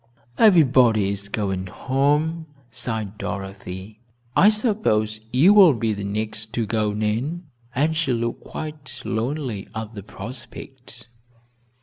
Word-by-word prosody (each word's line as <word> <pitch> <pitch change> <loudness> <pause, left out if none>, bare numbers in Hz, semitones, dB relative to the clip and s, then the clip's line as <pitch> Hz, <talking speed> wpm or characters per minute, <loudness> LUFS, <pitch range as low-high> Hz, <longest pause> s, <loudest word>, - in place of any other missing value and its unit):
"Everybody 130 - +5
is 100 0 -5
going 95 -3 -2
home," 145 - 0 0.2
sighed 110 -3 -3
Dorothy. 95 +1 -6 0.4
"I 200 - +7
suppose 200 - 0
you 155 +11 +6
will 190 -9 +8
be 115 -1 0
the 100 -1 -5
next 110 +2 -4
to 115 -2 0
go, 105 0 0
Nan," 110 - -2 0.3
and 155 +5 +2
she 160 -4 0
looked 115 -1 -2
quite 150 -5 -7
lonely 115 -1 -3
at 110 0 -5
the 105 - -7
prospect. 120 +3 -10
115 Hz, 120 wpm, -23 LUFS, 105-145 Hz, 0.4 s, will